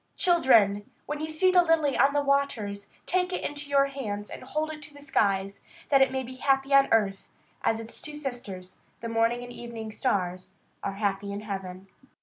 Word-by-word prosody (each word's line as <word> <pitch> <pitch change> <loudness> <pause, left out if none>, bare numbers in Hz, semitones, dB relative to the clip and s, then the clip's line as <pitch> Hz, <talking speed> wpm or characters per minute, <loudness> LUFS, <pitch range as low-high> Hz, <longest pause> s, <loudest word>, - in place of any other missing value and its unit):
Children! 230 - +4 0.2
when 295 0 -4
you 310 - -3
see 315 +4 +2
the 360 -1 +6
lily 325 -5 +2
on 275 +1 +4
the 290 0 +2
waters, 230 -8 0 0.2
take 365 0 +1
it 365 - -3
in 290 - -3
your 280 -1 +4
hands 215 -7 -5
and - - -7
hold 305 +4 -2
it 305 - -10
to 290 0 -10
the - - -12
skies, 200 -8 0 0.3
that 275 -2 +5
it 270 - +5
may 265 0 -2
be 255 +1 -9
happy 270 +1 +1
on 275 0 +6
earth, 200 -3 +1 0.3
as 225 - +2
its 225 0 -8
two 300 -1 -7
sisters, 240 -10 -6 0.2
the 230 - -4
morning 230 +1 +1
and 245 0 -9
evening 230 -2 -7
stars, 185 -5 -1 0.3
are 195 - -3
happy 200 0 -2
in 200 +1 -4
heaven. 190 -3 -6
245 Hz, 195 wpm, -27 LUFS, 205-285 Hz, 0.3 s, the